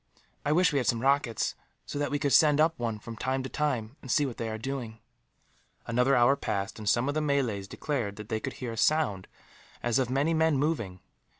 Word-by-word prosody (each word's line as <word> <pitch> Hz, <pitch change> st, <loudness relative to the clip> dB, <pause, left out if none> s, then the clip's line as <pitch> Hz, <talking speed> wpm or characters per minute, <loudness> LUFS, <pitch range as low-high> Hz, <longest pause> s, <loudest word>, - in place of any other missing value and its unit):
I 145 Hz, -, 0 dB
wish 170 Hz, 0 st, +4 dB
we 140 Hz, -, +3 dB
had 125 Hz, -, -2 dB
some 115 Hz, 0 st, +1 dB
rockets; 135 Hz, -5 st, +1 dB, 0.3 s
so 145 Hz, -, -5 dB
that 145 Hz, -, 0 dB
we 145 Hz, -, 0 dB
could 140 Hz, -2 st, 0 dB
send 150 Hz, 0 st, +6 dB
up 160 Hz, +1 st, +4 dB
one, 115 Hz, -2 st, -2 dB
from 115 Hz, +2 st, -9 dB
time 130 Hz, +3 st, -2 dB
to 130 Hz, -, -5 dB
time, 135 Hz, -4 st, -2 dB
and 130 Hz, -, -11 dB
see 145 Hz, +3 st, +3 dB
what 125 Hz, -4 st, -5 dB
they 115 Hz, -, -3 dB
are 110 Hz, -, -4 dB
doing." 120 Hz, -2 st, -5 dB, 0.9 s
Another 125 Hz, +4 st, +2 dB
hour 120 Hz, +3 st, +5 dB
passed, 100 Hz, -5 st, -3 dB
and 105 Hz, -1 st, -1 dB
some 120 Hz, +2 st, +2 dB
of 145 Hz, -, 0 dB
the 155 Hz, -, 0 dB
Malays 130 Hz, -10 st, 0 dB
declared 120 Hz, -5 st, -3 dB
that 105 Hz, 0 st, -9 dB
they 110 Hz, -1 st, -1 dB
could 130 Hz, +3 st, -5 dB
hear 125 Hz, -3 st, -5 dB
a 115 Hz, -, -7 dB
sound 130 Hz, -11 st, +1 dB, 0.6 s
as 120 Hz, +1 st, +2 dB
of 130 Hz, -2 st, 0 dB
many 140 Hz, +5 st, +1 dB
men 160 Hz, -2 st, +3 dB
moving. 115 Hz, -, -1 dB
130 Hz, 225 wpm, -28 LUFS, 115-145 Hz, 0.9 s, send